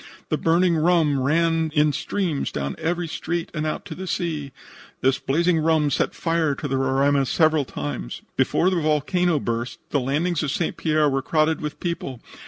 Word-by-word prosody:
The -, -, +1 dB
burning 170 Hz, +1 st, +3 dB
rum 155 Hz, -4 st, +3 dB
ran 165 Hz, +3 st, +2 dB
in 150 Hz, 0 st, +4 dB
streams 175 Hz, -6 st, -2 dB
down 70 Hz, -1 st, -3 dB
every 175 Hz, +1 st, -1 dB
street 165 Hz, +1 st, -3 dB
and 155 Hz, -1 st, -2 dB
out 155 Hz, -, -3 dB
to 180 Hz, -, -6 dB
the 185 Hz, +4 st, -7 dB
sea. 155 Hz, -6 st, -2 dB, 0.5 s
This 130 Hz, 0 st, +2 dB
blazing 170 Hz, +4 st, +1 dB
rum 155 Hz, -2 st, +2 dB
set -, -, 0 dB
fire 165 Hz, -3 st, 0 dB
to 145 Hz, -, -4 dB
the 135 Hz, -1 st, -1 dB
Roraima 135 Hz, +1 st, +2 dB
several 155 Hz, -2 st, +3 dB
times. 70 Hz, -, -5 dB
Before 185 Hz, +3 st, +2 dB
the 180 Hz, -3 st, 0 dB
volcano 155 Hz, +2 st, +1 dB
burst 120 Hz, -1 st, -3 dB
the 145 Hz, -, +2 dB
landings 150 Hz, +6 st, 0 dB
of 150 Hz, -, -1 dB
St. 165 Hz, +4 st, -1 dB
Pierre 155 Hz, -2 st, +2 dB
were 135 Hz, -1 st, 0 dB
crowded 155 Hz, +3 st, +1 dB
with 150 Hz, -1 st, -5 dB
people. 170 Hz, -8 st, -4 dB
155 Hz, 180 wpm, -23 LUFS, 140-170 Hz, 0.5 s, in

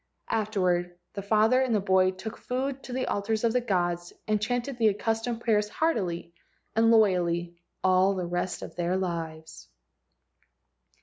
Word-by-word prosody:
Afterward 180 Hz, -5 st, 0 dB, 0.2 s
the 200 Hz, -, -4 dB
father 220 Hz, +5 st, +3 dB
and 255 Hz, -4 st, +1 dB
the -, -, +3 dB
boy 190 Hz, -1 st, +3 dB
took 190 Hz, +4 st, -6 dB
food 265 Hz, +2 st, -3 dB
to -, -, -8 dB
the 255 Hz, +1 st, -1 dB
altars 215 Hz, +2 st, -1 dB
of 230 Hz, -1 st, +2 dB
the 250 Hz, -, +2 dB
gods, 175 Hz, -5 st, -1 dB, 0.2 s
and 215 Hz, -1 st, +1 dB
chanted 245 Hz, +3 st, -2 dB
the 220 Hz, -2 st, +5 dB
accus¬ 225 Hz, +2 st, -1 dB
tomed 235 Hz, -1 st, -3 dB
prayers 210 Hz, -3 st, +2 dB
heartily 185 Hz, -, -1 dB, 0.4 s
and 225 Hz, +1 st, +4 dB
loyally 175 Hz, -6 st, +3 dB, 0.3 s
all 185 Hz, +1 st, +4 dB
the 180 Hz, -2 st, -2 dB
rest 175 Hz, +1 st, -3 dB
of -, -, -9 dB
their 175 Hz, +1 st, 0 dB
lives. 165 Hz, -3 st, -5 dB
205 Hz, 160 wpm, -27 LUFS, 175-225 Hz, 0.4 s, the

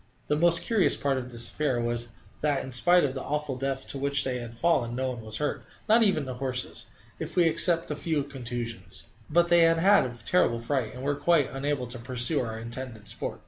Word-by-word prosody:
The 150 Hz, -, +3 dB
most 170 Hz, +2 st, +5 dB
curious 220 Hz, -5 st, +2 dB
part 135 Hz, -2 st, -1 dB
of 125 Hz, 0 st, -8 dB
this 120 Hz, 0 st, 0 dB
affair 140 Hz, -5 st, -1 dB
was 120 Hz, 0 st, -2 dB, 0.3 s
that, 145 Hz, -2 st, 0 dB
in 130 Hz, -, -8 dB
spite 175 Hz, +8 st, +4 dB
of 135 Hz, -3 st, 0 dB
the 135 Hz, -, -5 dB
awful 150 Hz, -1 st, -3 dB
depth 135 Hz, 0 st, -3 dB
to 140 Hz, -, -5 dB
which 140 Hz, 0 st, +1 dB
they 125 Hz, -1 st, -2 dB
had 120 Hz, -1 st, -8 dB
fallen, 125 Hz, -7 st, +1 dB
no 130 Hz, +1 st, -1 dB
one 120 Hz, -2 st, -6 dB
was 110 Hz, -1 st, -3 dB
hurt, 150 Hz, -1 st, -2 dB, 0.2 s
not 225 Hz, +2 st, +5 dB
even 195 Hz, -9 st, +2 dB
the 130 Hz, -, -5 dB
horses, 130 Hz, -1 st, -4 dB, 0.3 s
if -, -, -6 dB
we 180 Hz, -, +5 dB
except 165 Hz, 0 st, +4 dB
a -, -, -2 dB
few 150 Hz, 0 st, -1 dB
slight 140 Hz, -, -14 dB
contusions. 115 Hz, -7 st, -6 dB, 0.3 s
But 170 Hz, +2 st, +3 dB
they 175 Hz, -, +6 dB
had 165 Hz, 0 st, +5 dB
had 195 Hz, +2 st, +5 dB
a 120 Hz, -1 st, -6 dB
terrible 180 Hz, -9 st, +2 dB
fright, 120 Hz, -1 st, -2 dB
and 125 Hz, -, -8 dB
were 145 Hz, +1 st, +1 dB
quite 145 Hz, 0 st, +2 dB
unable 135 Hz, -1 st, -2 dB
to 120 Hz, 0 st, -5 dB
pursue 125 Hz, +4 st, -1 dB
our 110 Hz, -2 st, -4 dB
intended 115 Hz, -1 st, -8 dB
sport. -, -, -5 dB
135 Hz, 225 wpm, -27 LUFS, 120-155 Hz, 0.3 s, they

